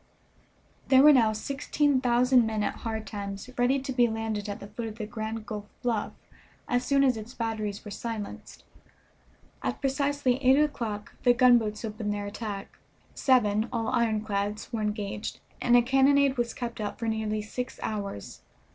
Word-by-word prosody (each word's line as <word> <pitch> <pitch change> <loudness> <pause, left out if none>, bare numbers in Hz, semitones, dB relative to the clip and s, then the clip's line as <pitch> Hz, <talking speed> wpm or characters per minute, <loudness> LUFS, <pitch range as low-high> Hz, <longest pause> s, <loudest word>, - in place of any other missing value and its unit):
There 265 0 +6
were 300 0 +9
now 230 -5 +5
sixteen 275 +4 0
thousand 250 0 +4
men 215 -1 -1
at - - -2
Hard 220 -1 -4
Times 200 +2 -6
ready 250 +2 +3
to 265 0 -4
be 245 -1 +4
landed 220 -2 -3
at 205 +2 -5
the - - -8
foot 215 +3 -6
of 220 0 -8
the 215 - -4
Grand 220 0 -5
Gulf 210 -1 -5 0.2
bluff 230 -4 -1 0.5
as 245 0 +1
soon 275 +1 +3
as 255 -4 +3
its 220 +4 -9
batteries 215 -3 -3
were 210 - -7
silenced. 220 -1 -6 1.0
At - - -2
precisely 280 -1 0
eight 260 +2 +6
o'clock 230 -9 -2
the 245 -1 +4
gunboats 235 -3 +4
opened 215 -1 -3
their 205 0 -3
attack. 205 -1 -6 0.3
Seven, 220 -4 +2
all 225 -2 -1
ironclads, 215 -2 -1
were 225 - -1
engaged, 210 0 -3 0.2
and 245 0 +5
a 240 - +5
cannonade 270 +2 +4
was 240 -2 -2
kept 235 -3 -5
up 205 - -4
for 230 - -3
nearly 215 -1 -1
six 250 +4 -5
hours. 200 - -5
225 Hz, 165 wpm, -28 LUFS, 210-250 Hz, 1.0 s, were